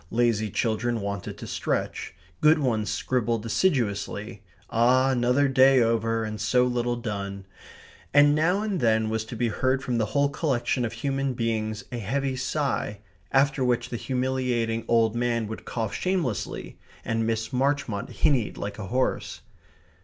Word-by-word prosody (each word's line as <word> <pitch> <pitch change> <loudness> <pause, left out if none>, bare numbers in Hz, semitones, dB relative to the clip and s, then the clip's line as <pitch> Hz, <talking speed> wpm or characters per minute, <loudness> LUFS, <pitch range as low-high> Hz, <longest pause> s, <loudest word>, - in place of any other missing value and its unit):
Lazy 115 -2 +1
children 115 +3 0
wanted 100 -2 -4
to - - -8
stretch. - - -3 0.2
Good 155 +1 +5
ones 115 -7 0
scribbled 115 -3 -1
assiduously 115 - -1 0.3
ah, 130 +3 +4
another 125 +3 +2
day 135 0 +5
over 115 -1 +1
and 110 -1 -5
so 125 +3 +3
little 120 -1 0
done! 100 -4 -5 0.7
And 145 +1 +6
now 175 +7 +2
and 205 -4 -1
then 110 -3 +2
was 110 0 -1
to 115 - -7
be 115 +1 0
heard 130 +4 0
from 120 -3 -1
the 110 - +1
whole 140 +6 +2
collection 135 -4 0
of 115 - -4
human 135 +2 -2
beings 110 -2 -2
a 120 - -3
heavy 135 +5 -1
sigh, 130 -6 -2 0.3
after 135 0 +3
which 120 -1 +1
the 120 - -3
humiliating 125 -3 -1
old 115 -1 +3
man 120 -1 0
would 110 - -7
cough 110 -3 -3
shamelessly, 175 - -2 0.3
and 115 0 0
Miss 115 0 -2
Marchmont 130 -5 0
hinnied 130 -7 +1
like 100 +2 -5
a 95 - -5
horse. 130 +6 -1
120 Hz, 155 wpm, -26 LUFS, 110-135 Hz, 0.7 s, And